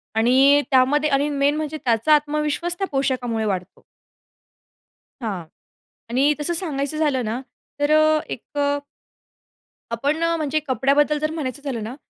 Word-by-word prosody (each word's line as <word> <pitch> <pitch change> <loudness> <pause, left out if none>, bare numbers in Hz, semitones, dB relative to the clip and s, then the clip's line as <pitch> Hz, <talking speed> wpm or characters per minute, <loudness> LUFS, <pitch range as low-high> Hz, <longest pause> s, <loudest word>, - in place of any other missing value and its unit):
आणि 265 +5 +5
त्यामध्ये 285 +4 +3
आणि 280 +1 +1
मेन 285 0 +1
म्हणजे 310 0 -3
त्याचा 235 +5 +3
आत्मविश्वास 300 +3 -1
त्या 390 - -1
पोशाखामुळे 255 -5 -1
वाढतो. 185 -3 -4 1.4
हां. 195 -7 -3 0.7
आणि 275 +5 +3
तसं 320 +4 -1
सांगायचं 305 -4 -3
झालं 285 -6 +1
ना 225 +4 -3 0.4
तर 290 +1 +1
अ, 310 0 +4
एक 235 - -5 0.2
अ, 285 0 +1 1.1
आपण 285 +8 -1
अ, 335 0 +2
म्हणजे 310 0 0
कपड्याबद्दल 280 +3 +2
जर 310 +1 -1
म्हणायचं 285 -4 -4
झालं 235 -6 -3
ना 230 +4 -6
285 Hz, 140 wpm, -22 LUFS, 255-305 Hz, 1.4 s, आणि